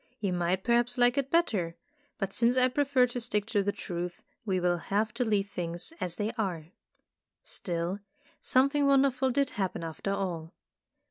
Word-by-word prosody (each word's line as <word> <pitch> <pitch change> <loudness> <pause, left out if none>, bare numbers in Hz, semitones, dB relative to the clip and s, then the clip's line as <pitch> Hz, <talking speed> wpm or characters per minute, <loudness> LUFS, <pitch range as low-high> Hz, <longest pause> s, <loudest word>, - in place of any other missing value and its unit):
You 195 -3 -1
might 180 +2 0
perhaps 240 +1 +2
like 245 0 +4
it 275 -1 -2
better, 205 - +1 0.4
but 195 -1 -3
since 235 +2 +2
I 255 0 +5
prefer 275 -1 +3
to 245 0 -5
stick 210 -3 0
to 205 -4 +3
the 200 +1 0
truth, 175 -3 -5 0.2
we 190 -2 +1
will 175 -1 +1
have 215 +5 -1
to 250 - 0
leave 205 -3 0
things 170 - -4
as 175 -1 -1
they 210 +4 -1
are. 175 -6 -2 0.7
Still, 175 +2 -2 0.4
something 280 +2 +3
wonderful 270 -1 +3
did 275 +1 +1
happen 190 -4 -2
after 165 +4 -4
all. 175 -5 -3
205 Hz, 165 wpm, -29 LUFS, 180-250 Hz, 0.7 s, I